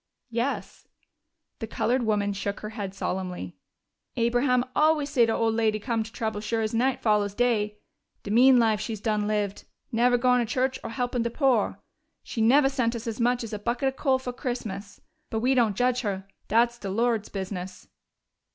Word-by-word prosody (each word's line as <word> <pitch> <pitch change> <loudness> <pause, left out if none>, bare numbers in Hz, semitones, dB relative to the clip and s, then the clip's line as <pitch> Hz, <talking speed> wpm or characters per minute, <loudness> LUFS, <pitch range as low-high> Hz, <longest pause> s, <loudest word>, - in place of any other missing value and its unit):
"Yes." 235 +4 -3 0.7
The 225 - -4
colored 245 +4 0
woman 205 -3 +1
shook 200 +1 -4
her 215 - -5
head 205 -3 -6
solemnly. 180 - -4 0.6
"Abraham 245 +2 +2
always 305 -2 +3
say 235 -3 +4
de - - +1
old 225 -1 +1
lady'd 215 -2 +1
come 230 -3 0
to 220 +1 -6
trouble 220 -2 -3
sure 225 +1 -1
as 215 - -2
night 250 +3 +1
follows 210 -2 +2
day. 210 -3 +1 0.5
De 200 - -5
mean 250 +3 +6
life 220 -3 +3
she's 215 -1 -4
done 210 -1 0
lived 205 -2 -2 0.3
neve' 245 +1 +3
goin' 250 0 +4
to 235 -1 -1
church 260 0 0
or - - -5
helpin' 245 +1 -1
de 235 - 0
poor. 250 -4 +1 0.4
She 225 - -4
neve' 270 +5 +5
sent 245 -4 0
us 230 - -5
so 230 0 -4
much 245 +1 +2
as 225 - -7
a 210 - -3
bucket 240 +5 0
of 265 - -9
coal 270 -2 +2
fo' 260 -1 -5
Christmas. 215 -6 -5 0.3
But 220 - -2
we 255 +3 +3
don't 230 -6 +2
judge 250 0 +2
her 195 -4 -3 0.2
dat's 235 +2 +2
de 195 - -5
Lord's 225 +1 0
business." 190 -2 -6
230 Hz, 190 wpm, -26 LUFS, 210-245 Hz, 0.7 s, mean